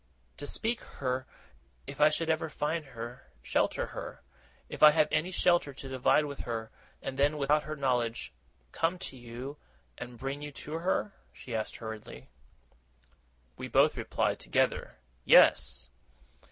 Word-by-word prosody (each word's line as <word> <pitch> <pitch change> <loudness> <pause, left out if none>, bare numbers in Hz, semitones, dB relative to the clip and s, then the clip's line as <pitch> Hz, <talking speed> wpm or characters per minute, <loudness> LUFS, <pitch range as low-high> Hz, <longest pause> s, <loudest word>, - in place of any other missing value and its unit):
'To 145 - -6
speak 230 +8 0
to - - -14
her, 130 -1 -1 0.6
if 140 - -7
I 150 - +8
should 160 +2 -1
ever 160 0 0
find 155 +2 -1
her; 120 -1 -8 0.2
shelter - - +1
her, - - -7 0.4
if - - -8
I 150 - +11
have 155 0 +4
any 155 +3 +1
shelter 175 -5 +2
to 135 - -8
divide 130 +3 +3
with 140 -1 -6
her; 115 -2 -4 0.3
and 135 0 -4
then, 145 +2 +3
without 150 +1 +3
her 155 - -4
knowledge, 125 -5 -1 0.4
come 165 +3 0
to 175 - -7
you, 125 +4 -7 0.4
and 120 -1 -7
bring 135 +3 -4
you 145 0 -6
to 155 +3 -5
her?' 190 +3 0 0.2
she 125 - -9
asked 110 -1 -2
hurriedly. 110 -2 -8 1.3
We - - -5
both - - +4
replied - - 0
together, - - 0 0.3
'Yes! - - +5
140 Hz, 155 wpm, -30 LUFS, 125-155 Hz, 1.3 s, I